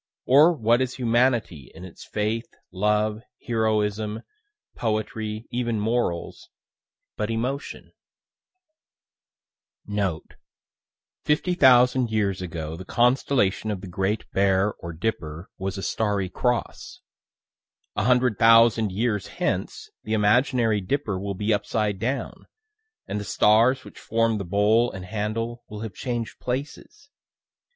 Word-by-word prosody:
Or 145 +6 +6
what 120 -4 +2
is 130 -1 -2
humanity 120 - 0
in 90 - -9
its 90 - -12
faith, 110 +2 -2 0.2
love, 105 +3 0 0.2
heroism, 110 -1 0 0.5
poetry, 110 0 -3
even 120 -2 -1
morals, 110 -5 -2 0.7
but 105 - -2
emotion? 125 +6 -4 1.9
Note: 100 -6 -3 0.9
"Fifty 150 +5 +1
thousand 125 -5 +5
years 100 -4 0
ago 80 -3 -5
the 90 - -8
constellation 120 -2 +1
of 100 -3 -3
the 95 - -8
Great 95 +4 -2
Bear 95 +1 +2
or 85 - -6
Dipper 80 -2 -4
was 95 +1 -3
a 95 - -5
starry 100 -4 -1
cross; 120 +6 -2 0.9
a 105 - 0
hundred 125 -4 +2
thousand 115 -2 +5
years 105 0 -1
hence - - -3
the 110 - -3
imaginary 110 0 +2
Dipper 105 -2 -2
will 100 0 -4
be 105 +3 0
upside 105 -1 -1
down, 125 +6 -3 0.6
and 105 - -3
the - - -5
stars 115 +6 +3
which - - -12
form 115 -1 0
the 100 - -4
bowl 105 +6 +3
and 95 -1 -8
handle 110 +4 -3
will 105 0 -7
have 110 -3 -6
changed 120 +1 -4
places. 145 - -6
110 Hz, 120 wpm, -24 LUFS, 100-120 Hz, 1.9 s, Or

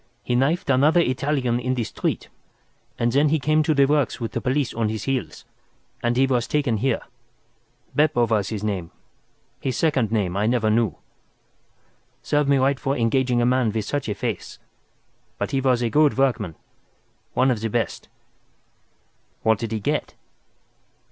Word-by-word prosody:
He 125 - -2
knifed 140 +5 +1
another 145 +6 +4
Italian 130 -4 0
in 130 +1 -1
the 120 - -1
street, - - -3 0.7
and 120 0 +1
then 145 +4 +3
he 160 - +2
came 155 +2 +2
to 155 0 +1
the 140 -1 +5
works 145 0 +1
with 115 -2 -4
the - - -3
police 130 0 0
on 110 -2 0
his 110 -1 -4
heels, 125 - -3 0.6
and 120 0 0
he 135 - +5
was 125 -3 0
taken 140 -7 0
here. 130 +2 0 0.9
Beppo 145 -5 +3
was 105 -4 0
his 105 -2 -4
name—his 105 +5 -6
second 135 -9 +1
name 100 -5 0
I 105 +2 +1
never 115 -2 +2
knew. 115 0 +1 1.3
Serve 145 -1 +1
me 140 0 +4
right 135 +1 +2
for 140 -1 -1
engaging 120 +1 +1
a - - +3
man 125 -2 +2
with 110 -1 -2
such 145 -5 -2
a 105 - -2
face. - - -4 0.8
But - - -3
he 135 - +1
was 125 -2 +2
a 115 - 0
good 150 -2 +3
workman—one 125 - -2
of 115 -4 -2
the 115 - -1
best." 115 +1 -2 1.3
"What 110 -2 +3
did 115 -2 -4
he 110 - -1
get?" 100 - -2
125 Hz, 165 wpm, -23 LUFS, 115-140 Hz, 1.3 s, the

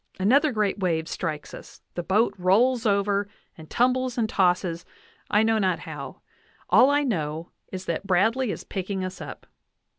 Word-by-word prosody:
Another 280 +10 +4
great 210 -3 0
wave 165 -4 0
strikes 155 -5 -4
us, - - -12
the 175 - -3
boat 205 +6 +2
rolls 225 +7 +3
over, 200 0 +1 0.3
and 160 -1 -13
tumbles 255 +1 +1
and 225 -2 +1
tosses, 180 -4 +1 0.5
I 210 +1 +4
know 225 0 +2
not 185 -4 +1
how. - - -8 0.5
All 260 - +7
I 290 +1 +2
know 160 - -3 0.2
is 185 0 -6
that 170 +4 -3
Bradley 225 +7 +2
is - - -4
picking 190 0 -4
us 185 +1 -7
up. - - -9
200 Hz, 160 wpm, -25 LUFS, 180-230 Hz, 0.5 s, All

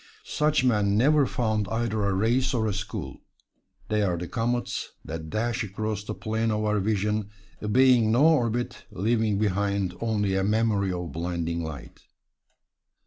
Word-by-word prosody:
Such 150 -3 +1
men 105 -5 +2
never 145 +3 +4
found 110 -5 -1
either 115 -2 -1
a 100 - +1
race 120 +7 +1
or 110 -2 +1
a 105 - 0
school. 105 -1 -5 0.7
They 105 0 +1
are 90 -4 +1
the 90 +1 -5
comets 120 +4 -2
that 80 0 -6
dash 115 +5 -1
across 105 0 -3
the 105 0 -5
plane 110 +1 -1
of 110 0 0
our 105 0 +1
vision, 105 0 0 0.3
obeying 120 +1 +4
no 125 +6 +4
orbit, 120 -7 +1
leaving 110 +1 0
behind 100 -2 0
only 105 -4 0
a 95 - +1
memory 105 -2 +1
of 90 -3 -4
blinding 85 +1 -2
light. 70 -7 -8
105 Hz, 150 wpm, -26 LUFS, 100-115 Hz, 0.7 s, never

